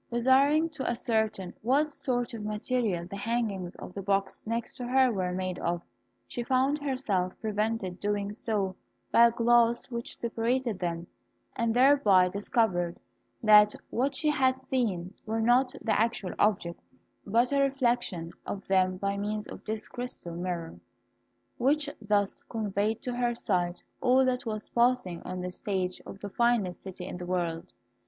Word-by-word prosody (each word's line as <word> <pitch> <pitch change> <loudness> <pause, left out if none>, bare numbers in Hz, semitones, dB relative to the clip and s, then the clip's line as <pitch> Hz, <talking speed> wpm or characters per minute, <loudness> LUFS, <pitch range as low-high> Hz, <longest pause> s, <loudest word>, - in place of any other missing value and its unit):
Desiring 270 +6 +4
to 290 -4 -3
ascertain 220 -6 -1
what 280 +7 +2
sort 245 -3 -1
of 225 -2 -5
material 210 -3 -1
the 195 +3 -7
hangings 200 -5 -2
of - - -9
the 195 - -5
box 195 +2 -1
next 230 +1 -2
to 245 - -6
her 260 0 +4
were 185 -4 -1
made 185 0 -3
of, 175 0 -1 0.5
she 240 - -5
found 265 +4 +1
herself 240 -10 -1
prevented 215 -3 -2
doing 205 0 -1
so 205 -4 -2 0.4
by 235 0 +7
a - - 0
glass 235 +1 +3
which 235 0 -4
separated 235 -1 -1
them, 170 -1 -2 0.5
and 230 0 0
thereby 245 -9 +5
discovered 180 -3 0 0.4
that 210 -1 +7 0.2
what 270 +3 0
she 300 +2 +2
had 260 -3 +2
seen 210 -9 -1
were 220 +1 -1
not 245 +3 +4
the 220 -2 +2
actual 225 -5 -1
objects, 180 -5 0 0.4
but 235 +6 +2
a 280 - +3
reflection 240 - 0
of 195 - -5
them 185 -1 +2
by 200 +1 -1
means 210 +1 -3
of - - -9
this 215 0 -3
crystal 245 -8 -6
mirror, 170 -1 -4 0.8
which 290 +4 +2
thus 205 -1 0
conveyed 215 0 -1
to 250 -3 -2
her 240 -1 0
sight 175 -5 -1 0.2
all 260 +1 +4
that 250 0 -1
was 215 -1 -3
passing 240 -8 +2
on 185 0 -5
the 180 0 -4
stage 185 -1 -3
of 195 - -9
the 205 - -5
finest 230 -4 +1
city 185 -1 -8
in 180 - -6
the 180 - -6
world. 170 -2 -2
220 Hz, 160 wpm, -29 LUFS, 185-245 Hz, 0.8 s, by